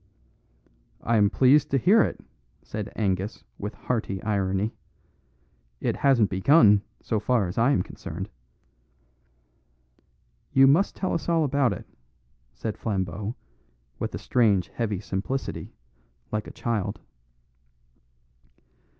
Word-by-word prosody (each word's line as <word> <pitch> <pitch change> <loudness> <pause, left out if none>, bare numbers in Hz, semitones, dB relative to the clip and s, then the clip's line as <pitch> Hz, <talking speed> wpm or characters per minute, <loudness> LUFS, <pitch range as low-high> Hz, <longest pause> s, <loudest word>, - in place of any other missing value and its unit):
"I 115 0 +2
am 100 -1 +4
pleased 135 +5 +4
to 135 - +2
hear 200 - +5
it," - - -1 0.4
said 105 -1 -5
Angus 100 0 -2 0.2
with 105 +2 -5
hearty 110 -6 -2
irony. 100 0 0 1.1
"It - - -1
hasn't 130 -7 +3
begun, 105 - +5 0.2
so 110 - 0
far 115 0 +1
as 90 - -6
I 120 +4 +4
am 95 -11 +2
concerned." - - -7 2.3
"You 135 0 +7
must 155 +9 +4
tell 185 - -2
us 170 - -2
all 165 -1 +3
about 140 -4 +2
it," 100 - -6 0.7
said 110 -2 -5
Flambeau 100 +1 -3 0.6
with - - -3
a - - -3
strange 105 -7 +2
heavy 105 -5 -2
simplicity, 105 +7 -4 0.6
like 105 0 -2
a - - -8
child. 115 -5 -2
110 Hz, 115 wpm, -26 LUFS, 100-135 Hz, 2.3 s, You